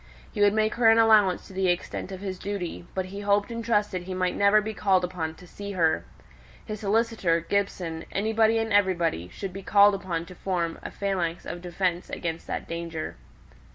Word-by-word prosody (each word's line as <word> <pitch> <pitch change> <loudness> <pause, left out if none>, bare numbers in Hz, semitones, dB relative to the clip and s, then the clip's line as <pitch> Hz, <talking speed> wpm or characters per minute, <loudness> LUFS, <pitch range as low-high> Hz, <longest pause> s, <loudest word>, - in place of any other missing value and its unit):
He 210 - -3
would 205 0 +5
make 215 0 +2
her 235 -1 +4
an 225 - +6
allowance 215 -5 +5
to - - -13
the 190 0 0
extent 175 +2 -2
of 190 0 -7
his 190 -2 -5
duty: 185 -4 -5
but 190 -1 -1
he 200 - -5
hoped 205 +2 +1
and 230 0 -4
trusted 210 -5 +1
he 185 +1 -6
might 185 -1 0
never 200 +1 +5
be 215 +1 -4
called 190 -3 +2
upon 165 -3 -3
to 180 - -14
see 200 +3 -7
her. 165 -4 +1 0.6
His 215 -1 -5
solicitor, 210 -5 +1
Gibson, 170 -2 -2
anybody 220 +2 +2
and 225 -1 -1
everybody, 170 - +2
should 195 - -6
be 195 - -6
called 205 +1 +6
upon 180 -4 -3
to 180 - -11
form 175 -3 -2
a - - -6
phalanx 185 -4 -2
of 175 - -6
defence 180 0 -2
against 165 -1 -4
that - - -4
danger. 165 -1 -5
190 Hz, 195 wpm, -26 LUFS, 175-205 Hz, 0.6 s, an